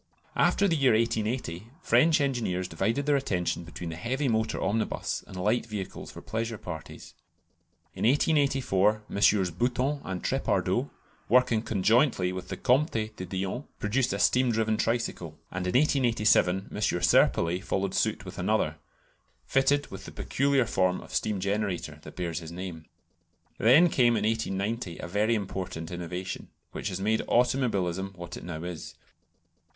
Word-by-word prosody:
After 200 - +3
the 170 - +2
year 135 -5 +4
1880 110 -4 -1 0.2
French 165 0 +4
engineers 115 -10 -1
divided 105 +11 -1
their 145 -1 +3
attention 90 -10 -1
between 85 0 -7
the - - -6
heavy 130 - -2
motor 110 -2 0
omnibus 110 +2 -1
and - - -11
light 105 +6 0
vehicles 105 -4 -6
for - - -11
pleasure 115 +1 -3
parties. 85 -5 -9 0.8
In - - -5
1884 130 -7 +2
MM. 100 -4 +2
Bouton 130 +4 0
and 95 -1 -5
Trépardoux, - - 0 0.4
working 125 -2 +4
conjointly 110 -1 +2
with 95 -1 -6
the - - -5
Comte 135 +5 +2 0.2
de 95 - -6
Dion, 95 +8 -3
produced 120 +5 0
a - - -1
steam 125 -1 +3
driven 110 -1 +1
tricycle, 110 -9 -2
and 90 0 -3
in 90 - +3
1887 115 -9 +2
M. - - -6
Serpollet 90 -1 +3
followed 95 -1 -1
suit 110 -2 0
with 95 +1 -8
another, 90 -5 0 0.7
fitted 140 +2 +2
with 95 0 -8
the - - -8
peculiar 140 -2 +1
form 95 -3 +1
of - - -12
steam 105 -2 0
generator 95 -6 -2
that - - -12
bears 85 -3 -3
his 80 -1 -9
name. 85 -3 -7 0.7
Then 135 +10 +6
came 120 -7 +3
in 105 - -1
1890 110 -3 -2
a - - -6
very 105 +5 +1
important 95 -5 -4
innovation, 90 +2 -5 0.2
which - - -4
has 95 -1 -4
made 110 +3 +1
automobilism 100 -7 +1
what 85 -1 -8
it - - -9
now 85 -2 -6
is. 90 -2 -7
105 Hz, 150 wpm, -28 LUFS, 90-120 Hz, 0.8 s, Then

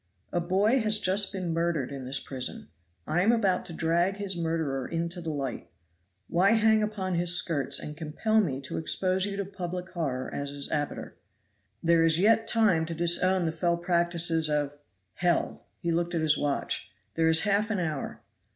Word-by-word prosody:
A 175 - +1
boy 200 +8 +2
has 215 -2 +1
just 190 +1 +2
been 185 -4 -3
murdered 165 -5 -1
in 135 -2 -6
this 135 +2 -1
prison. 130 - -5 0.4
I 175 +3 +1
am 210 +5 +4
about 195 -6 +1
to 170 - -7
drag 170 +4 +1
his 200 -2 -4
murderer 160 -6 -2
into 170 +1 -3
the 165 - -4
light; 140 -5 -4 0.6
why 190 +5 +3
hang 220 -1 +4
upon 205 -3 -2
his 175 0 +4
skirts 160 -6 +2
and 150 - -4
compel 165 +8 0
me 140 -9 -2
to 135 - -4
expose 185 +4 +1
you 200 -1 -4
to 200 - -2
public 180 -1 -6
horror 140 -8 -3
as 140 0 -3
his 140 0 -4
abettor? 145 -2 -3 0.7
There 165 0 +4
is 165 -1 +4
yet 220 +4 +3
time 195 -8 +3
to 165 - -4
disown 175 +2 +2
the 160 - 0
fell 170 +1 0
practices 170 -2 0
of 145 -1 -1 0.3
hell!" 175 -1 -1
He 170 - -2
looked 170 +1 -1
at 165 - 0
his 155 -1 +3
watch. 145 -1 -2 0.2
"There 165 0 +1
is 160 0 +4
half 210 +1 +1
an 215 - 0
hour. 155 -5 -4
170 Hz, 185 wpm, -28 LUFS, 160-190 Hz, 0.7 s, am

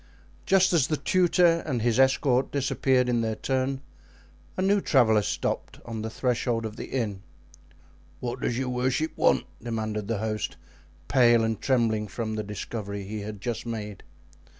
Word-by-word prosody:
Just 190 -1 +4
as 155 -6 +3
the 155 - 0
tutor 175 +2 +3
and 125 -7 -2
his 120 +1 +2
escort 130 -1 +3
disappeared 130 -2 +1
in 120 -1 +1
their 110 -1 -1
turn, 130 +2 -1 0.8
a - - 0
new 200 +1 +3
traveler 110 - +4
stopped - - -3
on 115 -2 -5
the 110 - -3
threshold 120 -1 -1
of 110 -1 -5
the - - -6
inn. 105 -7 -2 1.0
"What 125 +1 -4
does 120 - -1
your 130 -1 -1
worship 130 +5 0
want?" - - +3 0.2
demanded 110 -3 -3
the 115 - -1
host, 110 0 -3 0.5
pale 120 -3 +5
and 110 -2 -1
trembling 115 -5 +1
from 110 +2 -4
the 110 - -2
discovery 100 -1 -5
he 105 +2 -5
had 105 -1 -7
just 120 +1 -3
made. 105 -3 -5
120 Hz, 160 wpm, -27 LUFS, 110-130 Hz, 1.0 s, pale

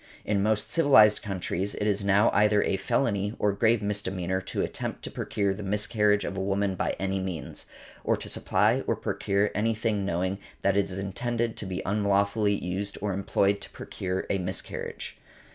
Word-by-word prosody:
In 100 -2 +1
most 105 0 0
civilized 135 -10 +6
countries 95 -1 -2
it 105 - -2
is 100 -1 +1
now 100 +2 +4
either 105 0 +4
a - - +1
felony, 105 -3 0
or 105 - +2
grave 110 +2 +2
misdemeanor, 95 -3 -2
to 95 - -2
attempt - - -4
to - - -5
procure 100 -2 -1
the 100 - -7
miscarriage 105 +1 +1
of 95 - -4
a 95 - -2
woman 100 0 0
by 95 - -1
any 95 0 -1
means; 95 -4 -5 0.4
or - - +2
to - - -7
supply - - +2
or - - +2
procure 100 +1 0
any 115 +2 +1
thing 110 -2 0
knowing 95 +1 -1 0.2
that 100 -1 +3
it 100 -1 +3
is 95 - -6
intended 115 +4 -2
to 105 - -5
be 95 0 -4
unlawfully 100 +1 +2
used 100 +2 -4
or 105 -2 -1
employed 100 +1 +1
to - - -7
procure 95 0 -4
a 100 - +1
miscarriage. 90 - -4
100 Hz, 180 wpm, -27 LUFS, 95-105 Hz, 0.4 s, civilized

